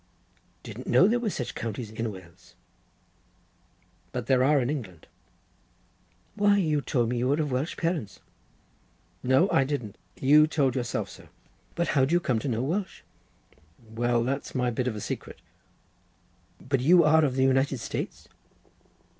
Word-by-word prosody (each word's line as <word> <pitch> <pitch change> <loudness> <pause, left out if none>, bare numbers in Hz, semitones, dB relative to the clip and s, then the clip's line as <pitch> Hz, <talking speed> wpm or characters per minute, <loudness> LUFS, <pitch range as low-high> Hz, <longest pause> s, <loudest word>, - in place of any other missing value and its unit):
"Didn't - - -9
know - - +5
there 240 +3 +2
were 235 -3 -1
such 125 -10 -4
counties 115 -1 -5
in 110 0 -3
Wales." 90 -4 -15 1.6
"But 125 -2 -4
there 130 0 +3
are 145 +2 +4
in 120 - 0
England." 110 - -5 1.3
"Why, 205 -1 +3
you 155 -6 +1
told 120 -5 0
me 120 0 -1
you 125 - 0
were 145 +3 +1
of 150 -3 -1
Welsh 130 +6 -2
parents." 160 - -2 1.0
"No, 130 +8 +3
I 135 - +4
didn't. 130 -7 -4 0.2
You 150 +3 +6
told 140 -5 +1
yourself 120 -2 -2
so." - - -14 0.5
"But 170 - -1
how 140 - +2
did 135 +5 +1
you 175 - +5
come 125 -9 0
to 140 - -5
know 120 -1 -1
Welsh?" 180 +7 -3 0.8
"Why, 120 +1 -1
that's 135 +4 -3
my 125 -1 +1
bit 125 +2 -2
of 120 - -2
a 105 - -6
secret." - - -6 1.2
"But 135 +1 -1
you 170 +7 +5
are 155 +1 +5
of 135 -4 0
the 130 - +2
United 135 +1 +2
States?" - - -5
130 Hz, 160 wpm, -27 LUFS, 120-150 Hz, 1.6 s, You